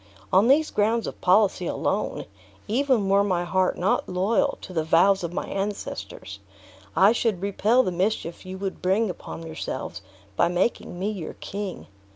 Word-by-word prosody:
On 195 +5 +5
these 300 +4 +4
grounds 220 +2 +1
of - - -7
policy 185 -1 +3
alone, - - -2 0.4
even 245 -2 +2
were 200 +1 +4
my 180 -3 0
heart 185 +1 +1
not 185 +3 0
loyal 190 +4 +1
to 185 - -9
the 160 -2 0
vows 180 +4 +4
of 170 - -3
my 175 - -3
ancestors, 105 - -5 0.6
I 190 +6 +6
should 225 -5 0
repel 215 +5 +3
the 185 - -1
mischief 180 -1 -2
you 185 0 -7
would 195 0 -5
bring 195 +3 +2
upon 165 -1 -9
yourselves 155 - -5 0.3
by 170 - +3
making 180 +1 -1
me 195 +4 -1
your 190 -6 -6
king. 200 -2 -6
195 Hz, 165 wpm, -25 LUFS, 175-210 Hz, 0.6 s, I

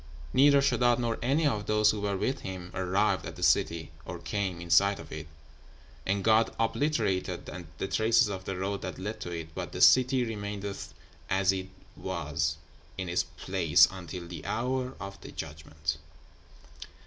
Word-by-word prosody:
Neither 140 +1 +6
Sheddád 120 -3 +3
nor 120 -2 -1
any 140 +6 +2
of 105 -7 0
those 105 0 +4
who 105 - -4
were 100 -1 -1
with 130 +7 -1
him 90 -2 -7
arrived 95 +3 +1
at - - -7
the - - -6
city, 85 -1 +2
or 90 - -6
came 90 +1 -3
in 85 -1 -7
sight 100 +4 +5
of 80 -2 -11
it, 75 0 -6 0.8
and 100 0 +1
God 110 +1 +4
obliterated 110 - 0 0.3
the - - -2
traces 110 +2 +3
of 95 -2 -5
the 95 - -3
road 100 +2 -2
that - - -5
led 105 +4 -5
to - - -4
it, 80 -2 -6
but - - -5
the - - -4
city 130 0 +6
remaineth 100 -3 -5 0.3
as 95 0 +3
it 95 0 -4 0.3
was 75 0 -2 0.4
in 95 -2 -3
its 90 0 +2 0.2
place 90 -5 +4
until 90 -2 -7
the 85 0 -8
hour 130 +2 -1
of 100 -1 -8
the - - -9
judgment!' 75 -1 -5
100 Hz, 170 wpm, -29 LUFS, 90-115 Hz, 0.8 s, Neither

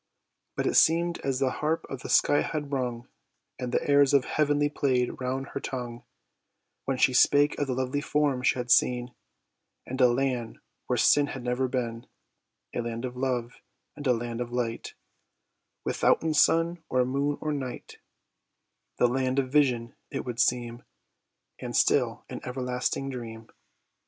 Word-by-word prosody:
But - - -1
it - - +1
seem'd 170 +1 +3
as 135 -2 -1
the 130 -1 +1
harp 155 +4 -1
of 135 -2 -7
the - - -7
sky 145 - +4
had 150 -3 -4
rung, 125 -3 -3 0.5
And 125 -1 -4
the - - -1
airs 140 -1 +5
of 135 -3 +3
heaven 145 -1 +1
play'd 130 -4 0
round 130 +2 -3
her - - -4
tongue, 120 -3 -6 0.8
When 135 -1 -1
she 130 - +3
spake 145 +3 +4
of 145 - 0
the 130 - -1
lovely 130 +2 -1
forms 145 -4 0
she - - +3
had 125 -1 -3
seen, 125 +1 +3 0.7
And 130 +1 -4
a 125 - +8
land 125 -2 -1 0.3
where - - 0
sin 145 -1 +4
had 135 -3 -6
never 125 +1 0
been; 120 -2 -3 0.7
A - - -1
land 115 +1 -4
of 125 0 -6
love 125 -2 -2 0.3
and 145 -2 -5
a 125 - +5
land 120 0 -4
of 120 0 -4
light, 120 -2 -3 0.9
Withouten 160 -1 +2
sun, 165 +2 +3
or 125 -1 +2
moon, 140 +3 -1
or 155 -1 -2
night; 130 -4 -6 1.0
The 125 - +4
land 130 +1 0
of 130 -2 0
vision 125 -5 +2 0.2
it - - -4
would 120 -2 -5
seem, 120 -1 0 0.8
And - - -5
still - - +2
an - - -7
everlasting 125 +1 -2
dream. 115 -3 -8
130 Hz, 160 wpm, -27 LUFS, 125-140 Hz, 1.0 s, a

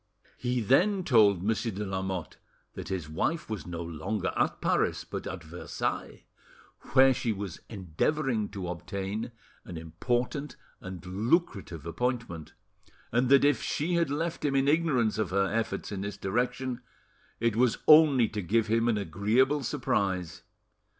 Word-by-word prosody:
He 125 0 0
then 185 - +3
told 105 - +4
Monsieur 115 +2 0
de 105 +1 -4
Lamotte 95 -2 -4 0.4
that - - -7
his 90 -5 -3
wife 150 - -1
was 105 -4 -4
no 85 -1 -4
longer 85 +5 -3
at - - 0
Paris, - - +1
but - - -6
at 95 -2 -6
Versailles, 85 +3 -4 0.7
where 135 0 +7
she 115 -1 -1
was 100 -4 -5
endeavouring 110 - -1
to 95 -3 -6
obtain 95 +6 -4 0.3
an 85 - -8
important 120 - -2 0.2
and 95 -1 -8
lucrative 100 - -1
appointment, 85 -2 -3 0.6
and 125 +2 +2
that, 140 0 +6
if 145 - +3
she 165 +4 -1
had 170 -3 +2
left 165 +4 -2
him 140 -2 +1
in 135 0 +3
ignorance 140 -9 +2
of 105 -5 0
her 100 +1 +2
efforts 115 -1 -2
in 100 -2 -4
this 100 0 -5
direction; 125 +5 -2 0.6
it 115 -2 +1
was 120 0 +3
only 150 -6 +7
to 105 -1 -4
give 110 +5 +1
him 115 +1 +1
an 115 -3 +2
agreeable 110 - +1
surprise. 100 - -1
110 Hz, 150 wpm, -29 LUFS, 95-130 Hz, 0.7 s, where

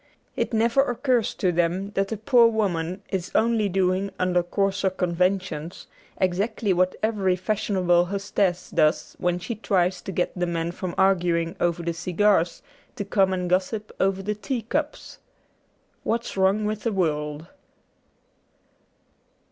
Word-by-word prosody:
It - - -1
never 230 +3 +3
occurs 250 -3 0
to 185 - +1
them 175 +4 0
that 195 -1 0
the 220 - -4
poor 235 +2 +5
woman 190 -4 -1
is 185 -2 -3
only 220 -2 +2
doing 190 +1 +1
under 180 -1 +2
coarser 195 +2 0
conventions 180 -2 -1 0.3
exactly 195 +3 0
what 185 +1 +1
every 200 -4 +1
fashionable 185 -3 +1
hostess 195 -1 -1
does 155 +1 +1
when 175 0 +1
she 180 +7 -4
tries 185 -4 0
to - - -6
get 180 -1 -1
the 180 -1 -1
men 170 0 -2
from 180 0 -5
arguing 175 -3 +2
over 170 0 0
the 170 0 -1
cigars 180 +1 +1 0.3
to 205 - -4
come 195 -1 +2
and 180 -1 -1
gossip 190 +4 -1
over 195 0 +1
the 210 +2 -1
teacups. 260 +7 -4 0.4
' - - -42
What's 230 +1 -2
Wrong 195 +2 +2
with 215 0 -2
the 230 - -1
World.' 150 -5 -1
190 Hz, 140 wpm, -24 LUFS, 175-210 Hz, 0.4 s, poor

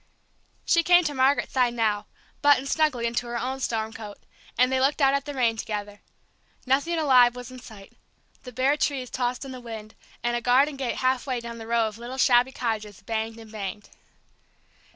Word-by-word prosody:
She 335 - +4
came 355 +1 +5
to 300 -3 -2
Margaret's 265 +1 +2
side 245 -2 +2
now, 215 -2 0 0.3
buttoned 285 -2 +4
snugly 275 -6 +1
into 235 +1 -1
her 240 0 -3
own 260 +3 -3
storm 225 -3 -2
coat, 210 -2 -9 0.4
and 250 +1 +4
they 260 - +2
looked 275 +4 +2
out 275 -1 +4
at 280 -1 0
the 290 - -5
rain 235 -3 +1
together. 205 -1 -5 0.6
Nothing 285 +6 +1
alive 250 -6 +5
was 250 0 -8
in 255 - -10
sight. 215 -5 -13 0.5
The 250 - -10
bare 265 +4 +1
trees 270 -4 -1
tossed 250 +1 -2
in 270 - -7
the 255 -1 -8
wind, 220 -2 -8 0.3
and 240 0 0
a 240 - -1
garden 265 +5 +3
gate 265 -3 -3
halfway 255 0 0
down 235 0 -8
the 225 - -9
row 230 -1 +2
of 215 +1 -8
little 245 +2 -7
shabby 250 0 +4
cottages 215 -6 -4
banged 225 +1 -3
and 225 -1 -12
banged. 205 -1 -6
245 Hz, 195 wpm, -25 LUFS, 225-265 Hz, 0.6 s, came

